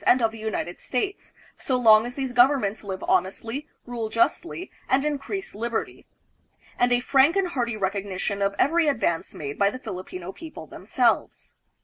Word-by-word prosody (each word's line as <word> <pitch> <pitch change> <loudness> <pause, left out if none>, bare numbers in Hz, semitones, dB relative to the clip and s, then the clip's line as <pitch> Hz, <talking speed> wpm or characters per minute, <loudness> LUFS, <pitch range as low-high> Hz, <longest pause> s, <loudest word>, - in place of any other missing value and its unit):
and 255 - +6
of 225 -2 +2
the 225 - -10
United 215 -5 -3
States, 390 +11 -3 0.3
so 260 - 0
long 220 -2 +6
as 245 - -8
these 265 -3 -3
governments 245 -5 +3
live 190 -2 -5
honestly, 225 +10 0 0.2
rule 235 -3 -4
justly, 335 - 0 0.2
and 270 +2 +3
increase 300 +7 -3
liberty; 230 +2 -4 0.7
and 245 0 +3
a 245 - +4
frank 275 +6 +4
and 390 -2 +1
hearty 240 -8 -2
rec 195 -1 0
ognition 200 0 -3
of 200 0 0
every 330 +3 +3
advance 220 - 0
made 145 -1 -6
by 200 0 +5
the 255 - -6
Filipino 185 -5 -7
people 320 +7 -10
themselves. - - -1
235 Hz, 165 wpm, -25 LUFS, 200-275 Hz, 0.7 s, and